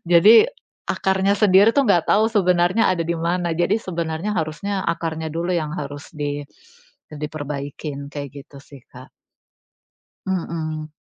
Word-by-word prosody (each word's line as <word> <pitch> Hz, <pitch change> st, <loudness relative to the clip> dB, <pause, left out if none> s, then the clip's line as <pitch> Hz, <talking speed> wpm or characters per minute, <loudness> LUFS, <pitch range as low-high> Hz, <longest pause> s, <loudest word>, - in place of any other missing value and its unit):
Jadi, 215 Hz, -, +7 dB, 0.4 s
akarnya 190 Hz, +1 st, +1 dB
sendiri 205 Hz, +1 st, +5 dB
tuh, 280 Hz, -, +4 dB
nggak 175 Hz, -4 st, +3 dB
tahu 215 Hz, +2 st, +4 dB
sebenarnya 180 Hz, +1 st, +3 dB
ada 170 Hz, -2 st, -2 dB
di 170 Hz, -, -1 dB
mana, 170 Hz, +1 st, -1 dB
jadi 185 Hz, +5 st, +2 dB
sebenarnya 170 Hz, -1 st, -3 dB
harusnya 190 Hz, +6 st, -2 dB
akarnya 160 Hz, -1 st, -3 dB
dulu 170 Hz, +2 st, -2 dB
yang 155 Hz, -2 st, -2 dB
harus 145 Hz, -1 st, -6 dB
di 145 Hz, -1 st, -3 dB, 0.7 s
diperbaikin, 145 Hz, -1 st, -6 dB
kayak 140 Hz, -2 st, -6 dB
gitu, 140 Hz, -, -17 dB
sih, 140 Hz, -2 st, -15 dB
Kak. 130 Hz, +1 st, -13 dB, 1.2 s
Mhm. 160 Hz, -4 st, -3 dB
165 Hz, 130 wpm, -21 LUFS, 150-190 Hz, 1.2 s, Jadi